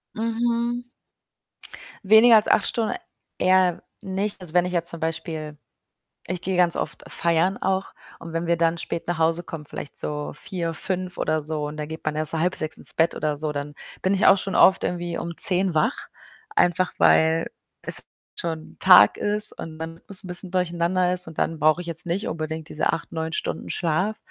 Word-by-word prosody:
Mhm. 235 +1 -1 1.2
Weniger 220 +2 +8
als 215 - +4
8 - - +3
Stunden 225 -2 -1 0.5
eher 185 -1 +3 0.2
nicht. 195 +2 -3
Also, 175 -3 -7
wenn 180 0 +4
ich 180 - -4
jetzt 170 0 0
zum 170 - -7
Beispiel 160 -2 -4 0.7
ich 180 +1 -3
gehe 185 0 -2
ganz 175 -2 +3
oft - - -4
feiern 170 +3 +1
auch 190 0 -1 0.3
und 165 0 -9
wenn 165 +1 -2
wir 170 0 +2
dann 165 0 +1
spät 165 +1 -5
nach 175 -2 -2
Hause 165 +2 +2
kommen, 150 -3 -8
vielleicht 145 - -8
so 150 0 -3
04:00, 170 +1 -4
05:00 185 +2 -3
oder 155 -1 0
so 150 -1 -3
und 150 +1 -7
dann 150 -1 -4
geht 160 +1 -8
man 155 0 -1
erst 155 0 0
halb 160 - -1
05:30 155 -4 -2
ins - - -5
Bett 165 0 +2
oder 150 -1 -1
so, 150 0 -3
dann 145 0 -5 0.3
bin 190 +1 +2
ich 195 - +3
auch 195 - +7
schon 195 - -3
oft 190 0 +5
irgendwie 175 -1 -2
um 170 -1 -5
10:00 185 -2 +4
wach, 155 - 0 0.5
einfach 175 0 +2
weil 160 +1 +4 0.3
es - - +1 0.4
schon 160 -2 -5
Tag 105 +1 +7
ist 210 +1 0
und 160 -1 -8
man 165 +1 -7 0.2
bisschen 180 0 -4
durcheinander 180 0 +1
ist 180 -2 -2
und 160 - -11
dann 165 -1 0
brauche 155 +3 +3
ich - - -10
jetzt 170 +1 -5
nicht 185 +5 -2
unbedingt 160 0 -4
diese 155 - +1
8, 165 - -4
9 160 0 -3
Stunden - - -4
Schlaf. 185 +5 0
170 Hz, 190 wpm, -24 LUFS, 160-185 Hz, 1.2 s, Weniger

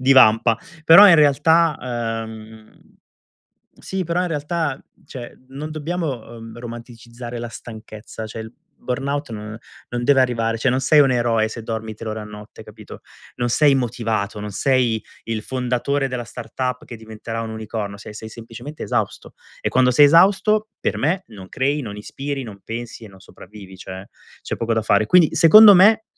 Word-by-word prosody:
divampa". 120 -3 +5 0.3
Però 195 +6 +9
in 175 - +8
realtà, 155 +2 +4 0.5
ehm 110 0 -13 1.0
sì 190 -1 -4
però 170 +2 -1
in 180 - -2
realtà 150 -2 -3 0.2
cioè, 120 -2 -10
non 145 +4 -7
dobbiamo, 155 -7 -4
ehm, 115 +1 -11
romanticizzare 120 0 -9
la 120 0 -5
stanchezza, 110 -1 -10
cioè 110 +1 -8
il 110 +1 -9 0.3
burnout 140 +2 -3
no 105 +1 -7 0.3
non 120 0 -4
deve 140 -1 +4
arrivare 115 -3 0
cioè 130 +2 +1
non 130 +1 0
sei 150 +3 +4
un 135 -2 +4
eroe 115 -3 +1
se 115 0 -8
dormi 110 -1 -5
3 110 +1 -8
ore 110 0 -4
a - - -7
notte, 105 +1 -12
capito? 105 -1 -13 0.4
Non 120 0 -1
sei 145 +2 +4
motivato, 115 -5 -2
non 105 - -6
sei 120 0 +1 0.2
il 115 -2 -4
fondatore 130 +2 -2
della 125 -2 -4
startup 125 +2 -5
che 120 - -9
diventerà 110 +1 -7
un 115 - -6
unicorno, 110 -2 -6
sei 105 0 -11
sei 110 +1 -8
semplicemente 120 +6 -10
esausto; 110 -5 -3 0.3
e - - -1
quando 125 0 +3
sei 145 +3 +6
esausto 200 +6 +4
per - - -1
me 180 +7 0
non 95 -4 -12
crei, 140 +3 -1
non 105 -3 -7
ispiri, 135 +5 -5
non 100 -3 -11
pensi 115 0 -7
e - - -11
non 95 -1 -17
sopravvivi, 95 -1 -14
cioè, 95 +1 -9 0.4
c'è - - -4
poco 115 0 -2
da 110 - 0
fare. 105 0 +2
Quindi 175 +1 +4
secondo 205 +5 +9
me, 215 +4 +5
120 Hz, 170 wpm, -20 LUFS, 110-145 Hz, 1.0 s, Però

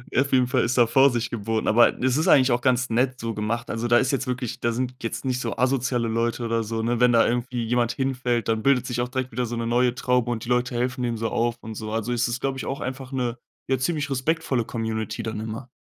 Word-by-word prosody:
Auf 140 +2 +2
jeden 130 -1 +4
Fall - - +1
ist 120 +2 0
da 120 - +6
Vorsicht 120 -1 +3
geboten, 110 0 -2
aber 120 +2 +4
es 130 0 +2
ist 160 +5 +1
eigentlich 130 -6 +5
auch 120 0 +1
ganz 125 -1 +2
nett 125 +2 +1
so 115 0 -3
gemacht. 110 +2 -3
Also, 115 +2 -2
da 120 - +5
ist 130 +1 +2
jetzt 135 -1 -1
wirklich 125 -2 -3
da 115 - 0
sind 125 +2 -3
jetzt 115 - -4
nicht 130 -1 0
so 115 -4 -3
asoziale 125 -1 +1
Leute 115 +1 -1
oder 115 0 0
so, 110 +1 -3
ne? 120 +1 0
Wenn 125 0 +5
da 115 -1 +4
irgendwie 120 0 -1
jemand 120 0 +1
hinfällt, 125 -3 -1
dann 110 -1 +1
bildet 135 0 +3
sich 120 -1 -2
auch 120 - -1
direkt 130 0 -3
wieder 125 +2 -1
so 120 - -4
'ne 115 - -2
neue 120 +1 +2
Traube 125 -2 +1
und 110 -2 -3
die 120 - -7
Leute 125 0 +1
helfen 125 +2 -1
dem 120 -1 -1
so 115 0 -2
auf 120 0 0
und 110 - -7
so. 110 0 -6
Also, 115 +2 -1
es 120 +1 +1
ist, 120 +1 -3
glaube 135 +1 -2
ich, - - -5
auch 135 - -4
einfach 130 +1 -5
'ne, 125 -2 -2 0.3
ja, 130 - +1
ziemlich 150 +1 -1
respektvolle 130 -2 0
Community 110 -1 -3
dann 110 -1 -4
immer. 110 +3 -6
120 Hz, 260 wpm, -24 LUFS, 115-130 Hz, 0.3 s, da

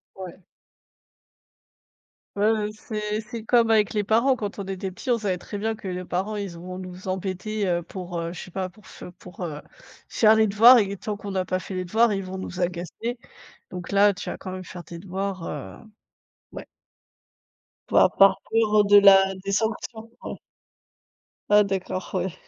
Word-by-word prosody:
Ouais. 185 -1 -10 1.9
Ouais, 205 +2 +3
ouais, 215 -1 0
c'est 215 0 -4
c'est 225 0 -8
comme 230 -1 +3
avec 215 -2 +3
les 210 - +1
parents, 230 +6 +3
quand 210 -4 -5
on 200 - -4
était 190 0 -4
petit, 185 - -10
on 235 - +2
savait 190 -4 -1
très 205 - -8
bien 220 +2 -2
que 205 - -11
les 180 0 -4
parents 190 +5 -2
ils 200 -2 -4
iront 180 +2 -8
nous 185 0 -9
embêter, 190 +3 -3
heu, 175 -1 0
pour, 180 -1 -6
heu, 165 0 -3
je - - -8
sais - - -11
pas, 185 +1 -3
pour 210 +3 -19
f - - -11 0.2
pour, 180 0 -8
heu, 150 -3 -6 0.5
faire 220 -1 +5
les 220 -1 +3
devoirs 235 +5 +8
et 200 -1 0
tant 210 +2 -4
qu'on 200 -1 -7
a 185 - +1
pas 185 0 -2
fait 190 - -7
les 185 0 -2
devoirs, 220 +4 +3
ils 195 -1 -2
vont 185 +1 -6
nous 185 -1 -7
agacer. 180 +7 -3 0.5
Donc 180 0 -7
là, 200 +1 +5
tu 200 - -6
vas - - -5
quand 185 - -8
même 185 0 -6
faire 180 -1 -9
tes 170 0 -10
devoirs, 190 0 -4
heu, 145 -3 -7 0.8
ouais. - - -8 1.2
Voi - - +6
par 195 0 +6
peur, 225 -1 +2
heu, 205 - +4
de 205 0 +6
la 195 -1 +7
des 200 - -2
sanctions, 220 +1 -2
ouais. - - -5 1.1
Ah, 210 0 +7
d'accord, 190 -2 -3
ouais. 185 -1 -1
195 Hz, 190 wpm, -24 LUFS, 185-215 Hz, 1.9 s, devoirs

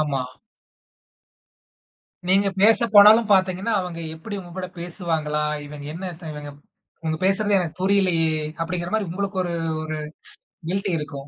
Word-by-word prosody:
ஆமா. 140 -4 -1 2.1
நீங்க 195 +1 +4
பேசப்போனாலும் 215 0 +7
பாத்தீங்கன்னா, 190 +3 +1
அவங்க 180 -2 -6 0.2
எப்படி 200 +6 -7
உங்ககூட 185 +1 -7
பேசுவாங்களா? 165 -4 -2 0.2
இவங்க 145 0 -9
என்னத்த 170 -2 -7
இவங்க 150 -1 -8 0.5
இவங்க 160 -1 -2
பேசுறது 200 +1 +3
எனக்கு 170 -4 -3
புரியலையே! 185 -4 +3 0.3
அப்படிகிற 175 +1 -3
மாரி 215 -4 -1
உங்களுக்கு 195 +1 -3
ஒரு 175 -1 -3 0.3
ஒரு 155 0 -4 0.7
கில்டி 195 +1 -1
இருக்கும். 140 -2 -7
180 Hz, 115 wpm, -22 LUFS, 160-200 Hz, 2.1 s, பேசப்போனாலும்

